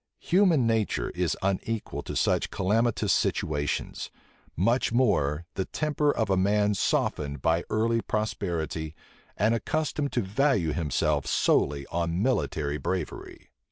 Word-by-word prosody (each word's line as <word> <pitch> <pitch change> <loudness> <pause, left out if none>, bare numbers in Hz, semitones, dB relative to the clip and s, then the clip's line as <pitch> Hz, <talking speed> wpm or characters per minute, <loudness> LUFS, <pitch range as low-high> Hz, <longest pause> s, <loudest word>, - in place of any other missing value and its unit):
Human 175 -8 +3
nature 115 -2 0
is 90 -3 -1
unequal 100 +3 -2
to - - -6
such - - +1
calamitous 110 +5 +1
situations; 75 -1 -1 0.5
much 115 +10 +2
more 85 - +1
the 95 - -2
temper 150 -1 0
of 110 -7 -1
a - - +4
man 105 +2 +2
softened 70 -7 -1
by 80 +1 +2
early 115 +1 +1
prosperity, 85 -8 -3 0.4
and 110 +3 +3
accustomed 145 +3 -1
to 120 - +1
value 100 - +1
himself 75 -2 0
solely 70 0 +2
on 85 0 -1
military 75 - 0
bravery. 90 -4 -5
100 Hz, 120 wpm, -27 LUFS, 80-115 Hz, 0.5 s, a